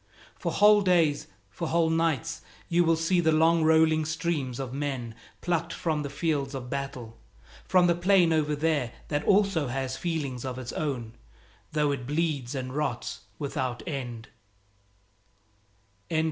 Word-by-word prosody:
For - - -3
whole 210 0 +6
days, 170 -6 +2 0.2
for - - -4
whole 165 -1 +2
nights, 165 -1 0 0.3
you 175 0 +3
will 165 -1 +3
see 165 +3 +1
the 160 -2 +3
long 160 +1 +4
rolling 160 0 +4
streams 155 -5 -2
of 130 -2 -4
men 135 -5 -3 0.3
plucked 175 -3 -1
from 155 -3 -1
the 140 - -4
fields 140 -2 -1
of 125 -2 -6
battle, 135 -5 -5 0.5
from 185 -1 +4
the 175 - +4
plain 175 -1 +4
over 150 -1 +1
there 145 -5 0 0.2
that 145 0 -1
also 195 -7 +3
has 130 +1 -3
feelings 145 -8 -3
of 130 -1 -4
its 130 -1 -6
own, 125 -7 -3 0.6
though 150 -1 +1
it 130 -3 -4
bleeds 145 -4 -1
and 130 -1 -4
rots 140 -4 -2 0.2
without 130 -4 -3
end. 120 -7 -5
150 Hz, 145 wpm, -27 LUFS, 135-165 Hz, 0.6 s, whole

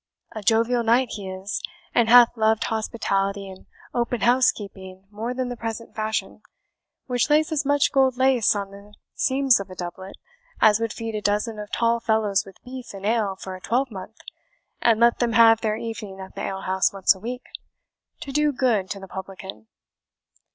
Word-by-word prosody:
A 215 - -4
jovial 230 +3 +2
knight 235 +2 +3
he 200 -3 -6
is, 190 +2 -4 0.3
and 235 -1 +3
hath 240 0 +7
loved 220 -1 +2
hospitality 200 -3 -1
and 190 -1 -12 0.3
open 240 -1 -1
housekeeping 200 -6 0
more 220 +4 -4
than 250 0 -3
the 245 - -4
present 230 0 -6
fashion, 215 -1 -3 0.6
which 245 +2 0
lays 305 +2 +3
as 300 -2 0
much 285 -1 +3
gold 265 -2 +3
lace 260 -5 +3
on 200 -1 -4
the 200 +1 -14 0.2
seams 265 -3 +3
of 195 -1 -7
a 185 - -9
doublet 185 +2 -7 0.4
as 215 -1 +5
would 230 -1 -2
feed 225 -1 -5
a 215 - -3
dozen 210 +2 -1
of 210 0 -8
tall 235 0 +1
fellows 220 -3 +1
with 195 - -13
beef 250 -4 -8
and 195 0 -8
ale 215 -3 +1
for 190 0 -7
a 185 - -12
twelvemonth, 225 -4 -3 0.6
and 225 -2 +3
let 235 0 +4
them 235 -2 +1
have 225 0 +6
their 215 -1 0
evening 210 -4 -6
at 190 0 -9
the - - -6
alehouse 190 0 0
once 195 0 +3
a 190 - -15
week, 245 +5 -6 0.8
to 275 - -6
do 300 +1 +2
good 240 -8 0
to 200 - -5
the 195 - -10
publican." 190 +2 -9
220 Hz, 180 wpm, -24 LUFS, 195-240 Hz, 0.8 s, hath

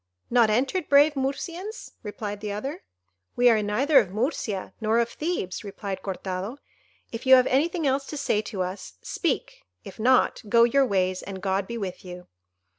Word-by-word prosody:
not 235 -2 +5
entered, 270 - 0
brave 290 +2 +6
Murcians?" 340 - -4
replied 205 -1 -5
the 210 -1 -4
other. 240 +9 -5 0.5
"We 245 0 +5
are 220 -2 +3
neither 260 +8 +4
of 205 -7 0
Murcia 210 - -2
nor 220 +1 +2
of 235 0 +2
Thebes," 300 - -3
replied 200 -1 -6
Cortado. 190 +4 -4 0.5
"If 230 +3 -6
you 260 - +10
have 255 -1 +5
anything 320 +5 +1
else 275 0 0
to 300 - -6
say 270 -6 +1
to 205 -3 -3
us, 185 - -6
speak; - - -2 0.2
if 195 - -11
not, 255 +3 +3
go 235 +2 +6
your 265 +3 +3
ways, 185 -3 0
and 195 -1 -7
God 190 0 -1
be 235 - -5
with 190 -5 -5
you." 180 -1 -9
230 Hz, 175 wpm, -25 LUFS, 195-270 Hz, 0.5 s, you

